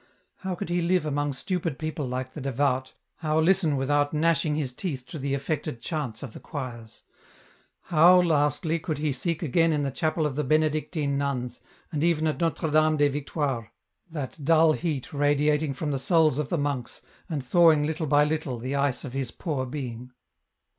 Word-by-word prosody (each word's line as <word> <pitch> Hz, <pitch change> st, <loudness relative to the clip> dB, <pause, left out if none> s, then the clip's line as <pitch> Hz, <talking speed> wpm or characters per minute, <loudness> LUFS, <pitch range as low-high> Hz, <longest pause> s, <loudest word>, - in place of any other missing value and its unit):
How 190 Hz, -1 st, -4 dB
could 170 Hz, -, -5 dB
he 175 Hz, 0 st, +1 dB
live 175 Hz, -1 st, +2 dB
among 145 Hz, -1 st, 0 dB
stupid 170 Hz, -1 st, -2 dB
people 155 Hz, -3 st, -3 dB
like 130 Hz, +1 st, -4 dB
the 150 Hz, -, -7 dB
devout, 130 Hz, 0 st, 0 dB, 0.2 s
how 155 Hz, -1 st, 0 dB
listen 165 Hz, -3 st, +3 dB
without 145 Hz, +2 st, +1 dB
gnashing 155 Hz, -1 st, +2 dB
his 140 Hz, -5 st, -2 dB
teeth 135 Hz, -4 st, -4 dB
to 160 Hz, -, -6 dB
the 140 Hz, 0 st, -1 dB
affected 140 Hz, -1 st, -3 dB
chants 135 Hz, -4 st, -4 dB
of 125 Hz, -5 st, -7 dB
the -, -, -9 dB
choirs? 120 Hz, -6 st, -7 dB, 0.8 s
How, 175 Hz, +3 st, +6 dB
lastly, 155 Hz, -1 st, +1 dB
could 155 Hz, -1 st, -3 dB
he 150 Hz, 0 st, 0 dB
seek 165 Hz, +5 st, -2 dB
again 165 Hz, +2 st, +3 dB
in 150 Hz, -2 st, 0 dB
the 140 Hz, -, -1 dB
chapel 155 Hz, +4 st, 0 dB
of 145 Hz, -3 st, -2 dB
the 150 Hz, -, 0 dB
Benedictine 155 Hz, 0 st, 0 dB
nuns, 130 Hz, -3 st, -3 dB, 0.3 s
and 150 Hz, -1 st, -1 dB
even 165 Hz, -2 st, +2 dB
at 155 Hz, +2 st, -1 dB
Notre 165 Hz, -1 st, 0 dB
Dame 155 Hz, 0 st, +4 dB
des 145 Hz, 0 st, +4 dB
Victoires, 140 Hz, -4 st, -2 dB, 0.4 s
that 150 Hz, -1 st, -6 dB
dull 160 Hz, +1 st, +5 dB
heat 155 Hz, -6 st, -3 dB
radiating 145 Hz, 0 st, +2 dB
from 150 Hz, +2 st, -2 dB
the 135 Hz, -, -1 dB
souls 155 Hz, 0 st, +3 dB
of 150 Hz, -, -2 dB
the 175 Hz, -, 0 dB
monks, 140 Hz, -4 st, -3 dB, 0.3 s
and 150 Hz, -5 st, -2 dB
thawing 160 Hz, +2 st, +5 dB
little 160 Hz, +1 st, -2 dB
by 145 Hz, +1 st, +5 dB
little 150 Hz, -4 st, -1 dB
the 130 Hz, +4 st, -4 dB
ice 140 Hz, -2 st, 0 dB
of 130 Hz, -, -7 dB
his 135 Hz, -3 st, -2 dB
poor 130 Hz, 0 st, -3 dB
being 125 Hz, -2 st, -6 dB
150 Hz, 185 wpm, -26 LUFS, 135-160 Hz, 0.8 s, How